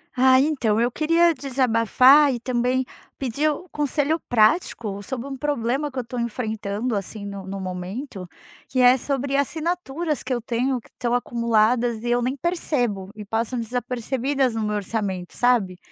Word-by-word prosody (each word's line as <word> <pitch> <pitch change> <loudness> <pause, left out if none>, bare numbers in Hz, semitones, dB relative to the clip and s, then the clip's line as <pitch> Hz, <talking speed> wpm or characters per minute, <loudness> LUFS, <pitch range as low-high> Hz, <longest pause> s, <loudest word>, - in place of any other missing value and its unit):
Ah, 260 +1 +5
então, 265 -8 +1
eu 240 - +1
queria 330 +4 +3
desabafar 260 +1 +4
e 240 - -3
também 250 +1 0 0.3
pedir 275 +4 0
um 305 +4 -4
conselho 295 +2 0
prático 215 - +2
sobre 245 +4 -5
um 270 - -5
problema 285 0 -1
que 265 - -12
eu - - -2
tô 240 +1 -6
enfrentando 220 -1 -2
assim 200 +1 -6
no 200 -1 -7
no 195 0 -5
momento, 185 +3 -6 0.4
que 255 - -2
é 250 +1 +7
sobre 275 +1 -1
assinaturas 320 +1 -2
que 255 - -3
eu 240 - -2
tenho 245 +2 -1
que - - -21
tão 240 -1 0
acumuladas 235 -1 +1
e 240 - -2
eu 240 0 +2
nem 255 +3 -1
percebo, 250 - -1
e 210 - -7
passam 225 +4 -2
desapercebidas 250 +2 -1
no 225 -1 -2
meu 210 0 -1
orçamento 195 -3 -3
sabe, 230 -7 +2
245 Hz, 160 wpm, -23 LUFS, 220-275 Hz, 0.4 s, é